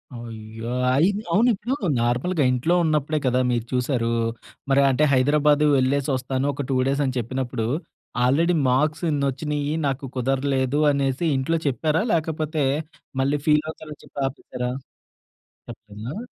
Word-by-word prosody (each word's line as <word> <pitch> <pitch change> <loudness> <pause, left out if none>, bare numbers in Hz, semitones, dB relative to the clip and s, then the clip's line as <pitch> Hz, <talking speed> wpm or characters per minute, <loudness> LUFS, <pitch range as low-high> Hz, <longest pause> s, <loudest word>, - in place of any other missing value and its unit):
అయ్యో! 115 0 -7 0.2
అయ్ 150 +7 +4 0.3
అవునిప్పుడు 235 +4 +2 0.2
నార్మల్‌గా 125 +8 +1
ఇంట్లో 130 +8 +1
ఉన్నప్పుడే 155 -1 +1
కదా 125 0 +2
మీరు 120 -2 -1
చూశారూ. 125 -2 0 0.6
మరంటే 140 +1 +4
హైదరాబాదు 145 +3 +3
వెళ్ళేసొస్తాను, 130 0 0
ఒక 140 0 -4
2 - - +1
డేసని 135 -1 0
చెప్పినప్పుడు, 120 -1 -3 0.6
ఆల్రెడీ 165 +7 +3
మార్క్స్ 150 +6 +1
ఇన్నొచ్చినియ్యీ, 145 +1 -1
నాకు 135 +1 -2
కుదరలేదు 135 +2 0
అనేసి 140 +2 0
ఇంట్లో 165 +5 0
చెప్పారా? 155 - +1
లేకపోతే, 155 -2 -1 0.6
మళ్ళీ 140 +2 +1
ఫీలవుతారని 155 0 0
చెప్పి - - -10
ఆపేశారా? 125 -2 -5 1.0
చెప్పలేదా? 115 - -8
140 Hz, 110 wpm, -23 LUFS, 125-150 Hz, 1.0 s, అయ్